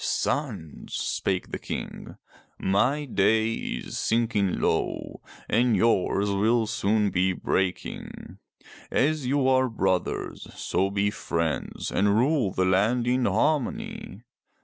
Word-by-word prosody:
"Sons," 80 -2 -2
spake 95 -2 -2
the - - -4
King, - - -6 0.4
*'my 130 +10 +1
day 110 -1 +2
is - - -4
sinking 110 -5 +1
low - - -1 0.3
and 120 -1 +3
yours 100 -2 +2
will 110 +4 +2
soon 105 -2 +1
be 95 +1 +2
breaking. 90 0 -3 0.5
As 150 -1 +1
you 135 0 +2
are 130 -1 +3
brothers, 95 -5 -1
so 95 +2 0
be 100 +1 0
friends 85 -6 -3
and 100 +1 +2
rule 130 -3 +2
the 95 - 0
land 105 +6 +2
in 125 +1 +2
harmony. 115 - -1
105 Hz, 115 wpm, -26 LUFS, 95-125 Hz, 0.5 s, and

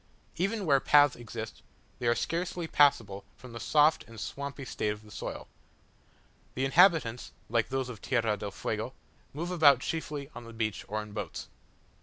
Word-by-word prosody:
Even 200 +3 -1
where 140 -4 +5
paths 145 0 +5
exist, 115 -1 -7 0.4
they 120 - -1
are 120 - +4
scarcely 175 +3 -2
passable 115 -11 +3
from 125 -2 -12
the 115 - -6
soft 150 +4 +4
and 115 -1 -11
swampy 140 -1 -5
state 110 - -2
of 105 +1 -7
the 105 - -15
soil. - - -6 1.1
The 130 - 0
inhabitants, 150 - +4 0.2
like 115 0 +1
those 135 -1 -1
of 115 -5 -8
Tierra 115 -5 +1
del 105 - -5
Fuego, - - -4 0.4
move 170 +5 -4
about 145 -7 +6
chiefly 150 -3 -4
on 120 - -9
the 115 - -10
beach 110 -2 -2
or 110 +1 -3
in 105 - -12
boats. 105 - -6
130 Hz, 170 wpm, -30 LUFS, 115-150 Hz, 1.1 s, about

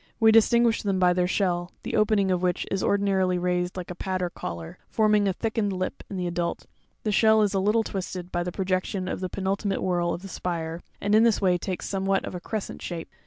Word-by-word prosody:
.We 220 -1 +6
distinguish 230 +1 +4
them 195 -2 0
by 180 -1 +4
their 180 0 +1
shell, 180 -2 0
the - - -3
opening 210 -3 +3
of 180 -1 +1
which 180 -1 0
1s 195 - 0
ordinarily 190 -2 +2
raised 180 0 -1
like 180 -1 -5
a - - -3
pad 185 +1 -3
or 175 - -2
collar, 85 - -7
forming 210 -2 +3
a 190 - +1
thickened 220 0 -1
lip 185 0 -3
in 195 - -5
the 180 - -2
adult; 175 0 -2 0.4
the 215 - 0
shell 220 +1 +5
is 205 - +1
a 195 - +2
little 210 +4 +2
twisted 185 -3 -5
by 175 - 0
the 180 +1 -3
projection 185 0 -1
of - - -3
the 185 -1 -3
penultimate 195 +1 -1
whorl 175 -2 +1
of 175 - -4
the - - -6
spire, 170 -3 -4 0.2
and 205 +1 0
ia 215 - +7
this 230 -2 +4
way 185 -2 +3
takes 185 0 -4
somewhat 195 0 0
of - - -6
a 180 - -4
crescent 215 +3 -5
shape. 170 -2 -5
190 Hz, 230 wpm, -26 LUFS, 180-205 Hz, 0.4 s, ia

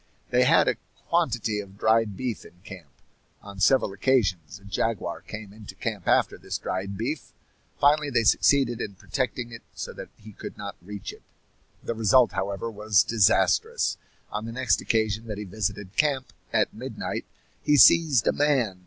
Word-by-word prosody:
They - - +4
had - - +5
a - - +1 0.3
quantity 105 -1 0
of 100 -1 -9
dried 110 -2 +2
beef 125 -4 -3
in 90 - -17
camp. 90 -7 -11 0.5
On 100 -1 -10
several 100 0 +3
occasions 100 - 0
a 100 - -19
jaguar 100 -3 -2
came 110 -2 -9
into 105 -1 -11
camp - - -5
after - - +2
this - - -4
dried 95 +1 -4
beef. 135 +8 -4 0.5
Finally 145 +1 +3
they 115 - +2
succeeded 120 +1 +3
in 100 - -5
protecting 125 +2 -3
it 115 - -9
so - - -6
that - - -9
he 110 +1 -13
could - - -9
not 100 -1 -6
reach 100 +2 -7
it. - - -16 0.6
The - - -2
result, 115 +3 +4
however, 100 +4 -3
was 105 -2 +3
disastrous. 110 -4 +2 0.3
On 105 +1 -4
the 115 - -6
next 130 +2 +1
occasion 110 0 0
that 105 -2 -5
he 105 - -5
visited 100 0 -4
camp, 140 -4 0 0.2
at - - +1
midnight, 115 0 -5 0.4
he 150 - +3
seized 145 -4 +6
a - - +4
man. 130 -10 +1
110 Hz, 170 wpm, -26 LUFS, 100-125 Hz, 0.6 s, seized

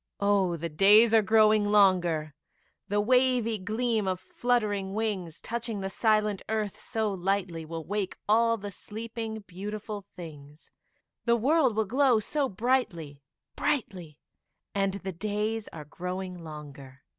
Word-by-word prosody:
Oh, 200 -4 +2
the 170 +1 -3
days 205 +8 +6
are 225 - +7
growing 215 0 +4
longer, 175 -7 +3 0.5
The 205 +1 0
wavy 245 -1 +2
gleam 220 +1 -1
of 185 -1 -1
fluttering 205 -4 -1
wings, 195 -7 -2
Touching 235 -2 -3
the 195 0 -3
silent 215 -2 +1
earth 215 -2 -2
so 220 -4 -2
lightly, 185 -3 -2
Will 165 0 -6
wake 205 -1 -2
all 230 +2 +4
the 205 -1 -7
sleeping, 220 +2 -6
beautiful 205 +2 -6
things, 150 -3 -11 0.5
The 235 -1 +4
world 265 0 +3
will 220 0 +1
glow 255 +1 +3
so 275 +5 -1
brightly 185 - -1 0.3
brightly; 190 - -2 0.6
And 195 -1 0
the 195 -1 -5
days 210 +4 -2
are 155 -2 -9
growing 180 +2 -6
longer. 140 -4 -10
205 Hz, 135 wpm, -28 LUFS, 180-225 Hz, 0.6 s, are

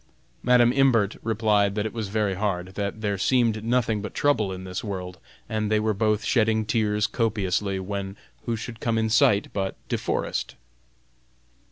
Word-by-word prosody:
Madam 125 -1 +4
Imbert 125 -7 +3
replied 105 -3 +1
that 105 0 -1
it 110 - -4
was 110 -3 -3
very 105 -1 0
hard; 95 -2 -2
that 100 +2 -4
there 100 -3 -1
seemed 115 -1 +2
nothing 115 -2 +1
but 105 - -7
trouble 110 -9 +2
in 95 0 -6
this 90 +1 -5
world, 90 -4 -5 0.3
and 110 -1 -1
they 110 - +3
were 110 0 +1
both 105 +1 +1
shedding 110 -2 +2
tears 105 -1 +1
copiously, 100 -4 -1
when 100 +1 -5 0.3
who 115 - 0
should 115 +1 -7
come 115 -1 0
in 110 -1 0
sight 105 -2 +4
but 95 -1 -2
De - - 0
Forest? - - -2
105 Hz, 170 wpm, -25 LUFS, 100-115 Hz, 0.3 s, Madam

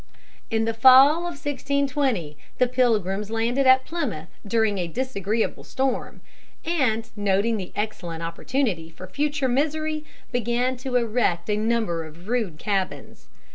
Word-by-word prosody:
In 225 -1 +1
the 225 - 0
fall 260 +6 +7
of 345 0 -4
1620 275 - -1 0.2
the 250 - +4
Pilgrims 215 -5 +1
landed 235 +4 +1
at 260 0 +6
Plymouth 240 - -4 0.2
during 220 -2 +1
a 175 - -1
disagreeable 220 0 -2
storm, 265 -1 -2 0.4
and, 255 -9 +1
noting 205 +2 +1
the 190 -3 -6
excellent 175 -6 -4
opportunity 170 0 -2
for 165 +3 -10
future 285 +7 -1
misery, 310 +4 0 0.3
began 245 +1 0
to 255 0 -4
erect 220 -6 +1
a - - +2
number 215 -6 0
of 160 +4 -13
rude 220 -10 -1
cabins. 195 +1 -3
230 Hz, 135 wpm, -24 LUFS, 195-265 Hz, 0.4 s, fall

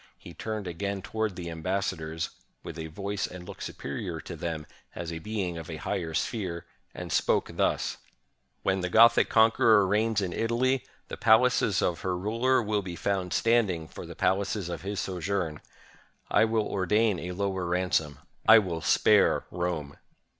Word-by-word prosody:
He 85 - -12
turned 110 0 -4
again 95 +2 -4
toward 110 -1 -2
the 85 -2 -6
ambassadors 85 -2 -3
— - - -45
with 85 - -7
a 80 - -4
voice 100 +5 -3
and 90 -1 -10
look - - -9
superior 80 +4 -5
to 85 - -8
them 80 -1 -4 0.3
as 85 -1 -5
a 80 - -5
being 90 -3 -3
of 80 - -9
a 80 - -4
higher 80 +2 -3
sphere 90 -3 -2
— - - -39
and - - -6
spoke - - +1
thus: - - 0 0.3
— 65 0 -47
"When 95 0 +1
the 90 - -2
Gothic 115 +5 +6
conqueror 110 -2 +5
reigns 105 +3 +1
in 95 -3 -2
Italy, 125 +3 +1 0.3
the - - -6
pal 110 +3 +6
aces 105 -5 +1
of 85 - 0
her 90 -1 -1
ruler 115 +7 +1
will 105 -1 0
be 90 -2 -6
found 95 -1 -1
standing 105 -9 +2
for - - -9
the - - -9
palaces 95 -1 0
of 85 -2 -5
his 100 +2 -4
sojourn. 90 -4 -2 0.7
I - - +5
will 110 -1 +1
ordain 105 +1 +1
a 90 +1 -5
lower 95 -1 -2
ransom; 85 -4 0 0.3
I 115 - +11
will 90 -6 0
spare - - +4
Rome." 85 -5 -3
95 Hz, 175 wpm, -28 LUFS, 85-110 Hz, 0.7 s, I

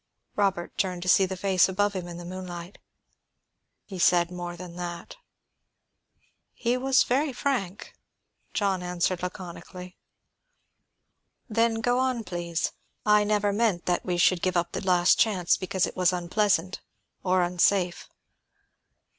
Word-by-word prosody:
Robert 195 -4 0
turned 180 -2 -1
to - - -7
see 190 +1 +5
the 190 0 -5
face 190 -1 +3
above 205 +2 0
him 185 -2 -5
in 170 -1 -8
the 175 - -8
moonlight. 180 0 -8 1.1
"He 190 -3 -8
said 175 0 +3
more 175 -1 -6
than 175 -1 -9
that." 175 - -6 1.4
"He 240 +1 0
was 260 +1 +3
very 275 +4 0
frank," 240 -8 -3 0.6
John 195 -3 0
answered 180 0 -1
laconically. 180 0 -8 1.5
"Then, 230 0 +1
go 245 +2 +1
on, 255 -3 0
please. 175 -3 -3 0.3
I 210 0 +5
never 205 -1 +1
meant 205 -5 +1
that 175 -1 0
we 180 -1 -1
should 175 0 +3
give 185 -1 0
up 175 0 0
the - - -4
last 180 -1 +4
chance 190 -6 +3
because 185 0 -1
it - - -7
was 180 -1 +3
unpleasant, 185 +1 0 0.4
or 185 -1 +2
unsafe. 180 0 +1
185 Hz, 140 wpm, -26 LUFS, 175-205 Hz, 1.5 s, see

